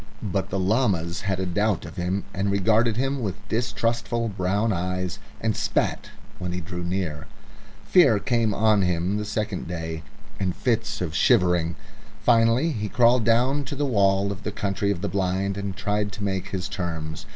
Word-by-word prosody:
But 95 -2 -1
the 95 - -2
llamas 95 -5 +1
had 95 -2 0
a 95 - -1
doubt 100 +2 0
of - - -9
him 90 +2 -1
and 100 +1 -1
regarded 110 +3 +2
him 135 +1 0
with 100 -2 -5
distrustful 115 +1 -1
brown 100 +3 0
eyes, 90 +1 -2 0.2
and 110 -2 0
spat - - -1 0.3
when 90 -1 -3
he 90 - -2
drew 90 +1 -6
near. 85 -4 -3 0.6
Fear 145 - +5
came 115 -1 +1
on 110 0 +3
him 90 +2 0
the 105 - -3
second 105 -3 -3
day 80 -2 -4 0.4
and 95 -3 -1
fits 115 -6 -1
of 85 -4 -2
shivering. 90 -5 +3 0.4
Finally 115 +6 +3
he 105 -6 -3
crawled 120 +1 +4
down 125 +5 +3
to 140 - -5
the 145 +1 0
wall 100 -5 +2
of 100 -1 -6
the 105 - -3
Country 100 0 -1
of 95 -4 -1
the 100 - -1
Blind 95 +1 0
and 100 -1 -4
tried 105 0 -1
to 105 - -6
make 95 -1 -2 0.2
terms. 85 -5 -4
100 Hz, 175 wpm, -25 LUFS, 90-115 Hz, 0.6 s, Fear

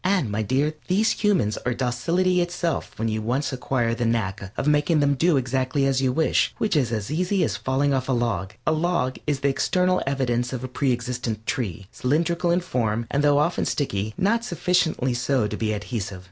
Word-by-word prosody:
And, 185 - +1
my 105 +2 -1
dear, 135 +8 +1
these 205 +4 +3
humans 185 - +1
are 125 -1 -1
docility 170 +10 +1
itself 175 -2 -2
when 115 - -1
you 110 0 -1
once 130 +5 -1
acquire 125 -2 0
the 115 - -2
knack 100 -4 -1
of - - -1
making 150 +2 +3
them 145 -1 +3
do 160 +3 +3
exactly 130 +2 0
as 135 -1 +1
you 130 -1 +2
wish, 160 +5 +1
which 215 - 0
is 130 -6 +2
as 110 +1 -3
easy 180 +4 +1
as - - 0
falling 140 +2 0
off 130 0 -1
a - - +3
log. 110 -6 -1
A - - +3
log 155 -5 0
is 145 -2 0
the 140 - +2
external 180 +6 +1
evidence 125 -2 0
of 130 -1 -4
a - - -3
pre 130 +1 0
existent 120 -2 -3
tree, 100 -8 -3
cylindrical 170 +6 0
in 175 +1 +3
form, 115 -8 -1
and 145 +1 +1
though 145 -1 +4
often 150 +4 +1
sticky, 110 -6 -2
not 230 +5 +2
sufficiently 180 - +1
so 125 -1 +1
to 105 - -3
be 110 -1 -1
adhesive. 105 -2 -4
130 Hz, 200 wpm, -24 LUFS, 120-160 Hz, -, though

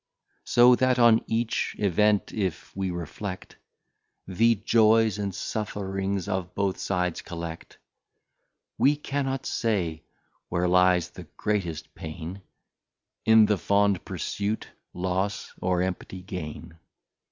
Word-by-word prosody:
So 120 +1 +6
that 130 0 +2
on 115 -2 +5
each 115 +1 -1
Event 105 +1 +2
if 95 -6 -3
we 95 -1 -1
reflect, 90 +3 -6 0.7
The 115 +5 +3
Joys 110 0 +3
and 100 -1 -1
Sufferings 100 -2 -3
of 95 -3 -3
both 100 -1 -1
sides 90 -3 -1
collect, 85 -1 -7 1.0
We 145 +2 +5
cannot 135 -2 -3
say 90 -9 -1 0.5
where 90 0 0
lies 90 -1 +3
the - - -11
greatest 90 -7 -2
Pain, 80 +4 -7 0.9
In 110 -1 +7
the 105 -2 +1
fond 100 -2 +2
Pursuit, 105 +2 -3 0.2
Loss, 95 +2 -2
or 90 -1 +1
Empty 95 0 -5
Gain. 85 -2 -7
95 Hz, 110 wpm, -26 LUFS, 90-110 Hz, 1.0 s, In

